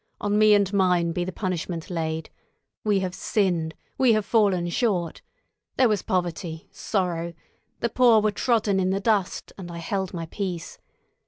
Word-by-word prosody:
On 205 0 +1
me 215 -1 +7
and 200 -1 +1
mine 180 -3 +3
be 175 +1 -1
the 185 - -4
punishment 180 -3 -4
laid. 160 -2 -3 0.5
We 205 -3 +2
have 185 -1 -2
sinned, 175 -6 0 0.2
we 255 -3 +5
have 215 -2 +1
fallen 195 -6 +2
short. 180 -5 -1 0.6
There 255 - +5
was 210 -4 +1
poverty, 175 -4 -3
sorrow; 170 -4 -2 0.5
the 235 - +1
poor 240 -2 +5
were 215 0 +1
trodden 210 -3 +1
in 185 0 +1
the 195 +1 0
dust, 205 -3 0
and 175 -2 -7
I 170 - -7
held 190 +2 -2
my 165 -2 -4
peace. 175 -1 -5
185 Hz, 165 wpm, -25 LUFS, 170-210 Hz, 0.6 s, me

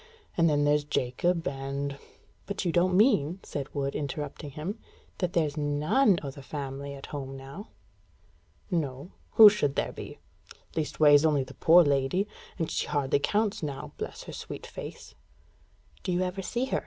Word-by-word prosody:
And 165 -1 +4
then 145 -1 +2
there's 145 0 +3
Jacob 155 +5 0
and 140 +1 -3 0.2
" - - -34
"But 200 -1 -3
you 175 - +2
don't 180 +2 +3
mean," 190 - +3
said 140 -1 -5
Wood, 140 -1 -1
interrupting 145 +1 -4
him, 165 - -5 0.4
"that 180 -1 -1
there's 155 -4 +1
none 150 - +3
o' 140 - -4
the 140 - -11
family 140 0 -5
at 135 - -9
home 135 -2 -5
now?" 135 - -9 1.0
"No. 150 -1 -2 0.2
Who 220 - +11
should 175 -10 +3
there - - 0
be? - - -8 0.6
Least 155 -3 -3
ways, 145 -1 +7
only 150 -4 +3
the 130 +1 -11
poor 170 +5 +6
lady. 145 +7 +1 0.3
And 165 -3 -2
she - - -1
hardly 140 -1 +1
counts 205 +7 0
now 145 -4 -5
bless - - -6
her - - -9
sweet - - -7
face!" - - -9 0.9
"Do - - -2
you 175 +1 +1
ever 185 +1 -3
see 240 +7 -1
her?" 265 - 0
150 Hz, 170 wpm, -28 LUFS, 140-180 Hz, 1.0 s, Who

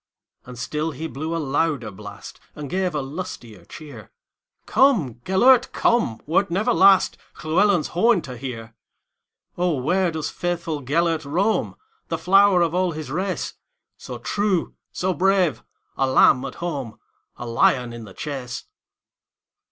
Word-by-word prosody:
And 125 -1 -9
still 150 +6 -2
he 160 +1 -6
blew 160 +2 -4
a - - 0
louder 145 -5 -1
blast, 100 +1 -11 0.2
And 145 -3 -7
gave 185 -3 -1
a 145 - -1
lustier 135 - -8
cheer:"Come, 150 - -2
Gêlert, 245 +7 +5
come, 220 - +1
wert 175 +5 +1
never 200 +8 +1
lastLlewelyn's 190 -2 +3
horn 215 0 +2
to 130 -4 -8
hear."O, 125 +7 -7
where 180 +8 +1
doth 160 -2 -4
faithful 170 -4 -3
Gêlert 160 +4 0
roam, 185 +10 0 0.3
The 165 - -2
flower 190 +1 +5
of 165 -1 -1
all 180 -1 +1
his 155 -3 -7
race, 185 +4 -2 0.4
So - - -8
true, 200 -4 -1 0.2
so 185 +1 -1
brave,—a 175 - 0
lamb 130 0 +5
at 135 - -7
home,A 135 -7 -7
lion 120 +1 +2
in 120 -1 -8
the 95 - -13
chase?" 130 -4 -5
160 Hz, 130 wpm, -23 LUFS, 130-185 Hz, 0.4 s, Gêlert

